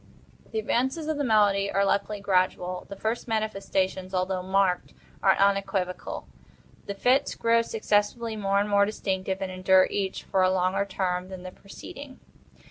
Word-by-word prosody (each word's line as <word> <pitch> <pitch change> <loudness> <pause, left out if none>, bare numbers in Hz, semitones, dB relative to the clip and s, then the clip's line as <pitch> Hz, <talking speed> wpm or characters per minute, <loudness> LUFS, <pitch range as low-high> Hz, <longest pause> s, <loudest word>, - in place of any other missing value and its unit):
The 220 - -3
advances 265 +8 0
of 315 -1 -1
the - - +1
malady 205 -4 +3
are, 200 +1 +2
luckily, 200 +1 0
gradual. 185 -2 0
The 200 - -6
first 220 +5 -3
manifestations, 195 -4 -1
although 185 0 0
marked, 190 -1 0 0.3
are 190 -1 +4
unequivocal. 195 -2 0 0.6
The 200 - -4
fits 250 +7 +2
grow 230 0 +3
successively 220 +1 0
more 200 -1 +1
and 205 - 0
more 200 -1 +4
distinctive, 190 -2 -2
and 185 - -4
endure 185 0 +4
each 195 -2 -2
for 190 - 0
a 185 - +4
longer 185 +1 +1
term 185 -2 -2
than 185 -1 -8
the 185 - -7
preceding. 260 +8 -11
195 Hz, 155 wpm, -26 LUFS, 185-215 Hz, 0.6 s, are